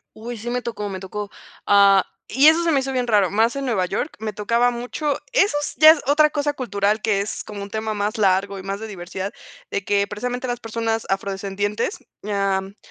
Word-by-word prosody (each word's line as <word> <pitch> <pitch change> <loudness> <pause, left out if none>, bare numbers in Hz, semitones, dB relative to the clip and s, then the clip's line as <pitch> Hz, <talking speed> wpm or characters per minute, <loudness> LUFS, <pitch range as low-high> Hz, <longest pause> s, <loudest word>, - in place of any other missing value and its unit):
Uy, 235 +2 -7
sí 235 +3 -6
me 250 0 -1
tocó, 210 -4 -4
me 190 -1 -5
tocó. 205 +2 -6 0.4
Ah, 200 -1 +6 0.2
y 275 +5 +4
eso 320 +2 +5
se 335 - +2
me 280 - +3
hizo 270 0 -3
bien 250 -2 -1
raro, 205 -5 +3
más 225 +4 +2
en 275 - -3
Nueva 210 -8 +1
York 205 - -3
me 215 -1 -4
tocaba 230 +4 +2
mucho. 250 +5 -2 0.2
Eso 410 -10 +3
es - - -4
ya, 310 +1 +10
es 320 -2 +1
otra 300 +2 +4
cosa 290 -1 -1
cultural 210 -5 0
que 205 -3 +1
es 205 - -4
como 205 -1 -7
un 200 - -8
tema 220 +1 -3
más 210 +1 -2
largo 195 -1 +2
y - - -9
más 195 +1 -4
de 220 - -5
diversidad, 190 0 -6 0.5
que 200 0 +1
precisamente 245 +5 -4
las 245 0 -3
personas 225 0 -2
afrodescendientes, 200 - -2 0.3
am, 195 -1 -1
215 Hz, 210 wpm, -22 LUFS, 200-245 Hz, 0.5 s, ya